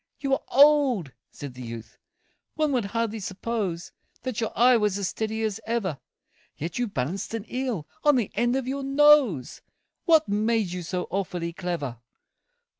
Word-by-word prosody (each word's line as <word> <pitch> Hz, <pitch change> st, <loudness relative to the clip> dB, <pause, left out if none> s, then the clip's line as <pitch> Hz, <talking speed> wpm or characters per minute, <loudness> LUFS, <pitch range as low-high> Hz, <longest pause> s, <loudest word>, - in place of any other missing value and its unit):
"You 275 Hz, -1 st, -1 dB
are -, -, +1 dB
old," 275 Hz, -, +4 dB, 0.2 s
said 140 Hz, -3 st, -8 dB
the 125 Hz, -, -10 dB
youth, 115 Hz, -2 st, -9 dB, 0.6 s
"one 310 Hz, -2 st, +1 dB
would 245 Hz, -6 st, +1 dB
hardly 225 Hz, +1 st, -2 dB
suppose 195 Hz, -3 st, -3 dB, 0.3 s
That 255 Hz, -3 st, -3 dB
your 225 Hz, -, -1 dB
eye 250 Hz, +2 st, +6 dB
was 210 Hz, -3 st, +1 dB
as 200 Hz, -2 st, -1 dB
steady 220 Hz, 0 st, -3 dB
as 215 Hz, -3 st, -1 dB
ever; 200 Hz, -, -1 dB, 0.6 s
Yet 165 Hz, +8 st, -4 dB
you 245 Hz, -, +1 dB
balanced 185 Hz, -, -3 dB
an 225 Hz, -2 st, -5 dB
eel 250 Hz, -, -3 dB, 0.2 s
on 295 Hz, -1 st, +5 dB
the 235 Hz, -6 st, 0 dB
end 240 Hz, +3 st, +1 dB
of 265 Hz, -2 st, -2 dB
your 275 Hz, +1 st, -2 dB
nose 275 Hz, -, +4 dB, 0.4 s
What 320 Hz, -3 st, +5 dB
made 215 Hz, -1 st, +1 dB
you 180 Hz, 0 st, -4 dB
so 180 Hz, +1 st, -3 dB
awfully 175 Hz, -3 st, -2 dB
clever?" 165 Hz, -10 st, -4 dB
220 Hz, 165 wpm, -26 LUFS, 180-255 Hz, 0.6 s, eye